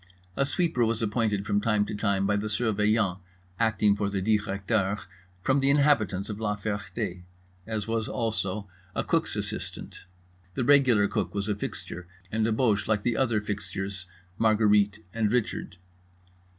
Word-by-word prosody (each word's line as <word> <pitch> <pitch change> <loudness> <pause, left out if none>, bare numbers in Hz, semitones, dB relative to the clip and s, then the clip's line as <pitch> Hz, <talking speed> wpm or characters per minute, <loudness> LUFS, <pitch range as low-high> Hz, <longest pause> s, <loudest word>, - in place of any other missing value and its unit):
A 140 - +1
sweeper 160 -5 +1
was 115 0 0
appointed 105 -2 0
from 100 0 +1
time 105 -1 +2
to 105 - -5
time 100 -2 +1
by 105 +1 +2
the 105 +1 -1
Surveillant, 105 -3 +1 0.4
acting 105 -2 +3
for 100 -1 -1
the 100 -1 -1
Directeur, 105 0 0 0.5
from 135 +6 +3
the 135 0 +2
inhabitants 140 -10 +3
of 105 -1 -5
La 105 -2 0
Ferté; 105 -2 -4 0.5
as 110 -1 -3
was 115 -1 -1
also 105 -3 -2 0.3
a - - 0
cook's - - 0
assistant. - - -6 0.5
The - - 0
regular 125 -6 +5
cook - - -2
was 100 0 -1
a 105 - +1
fixture, 90 -3 -6 0.2
and 110 0 +1
a - - +1
Boche 110 -3 +2
like 105 -2 +1
the 120 -2 +1
other 115 -3 +2
fixtures, 100 -2 -4 0.3
Marguerite 105 -1 +3
and 110 -2 +1
Richard. 115 -5 -1
105 Hz, 155 wpm, -27 LUFS, 100-115 Hz, 0.5 s, regular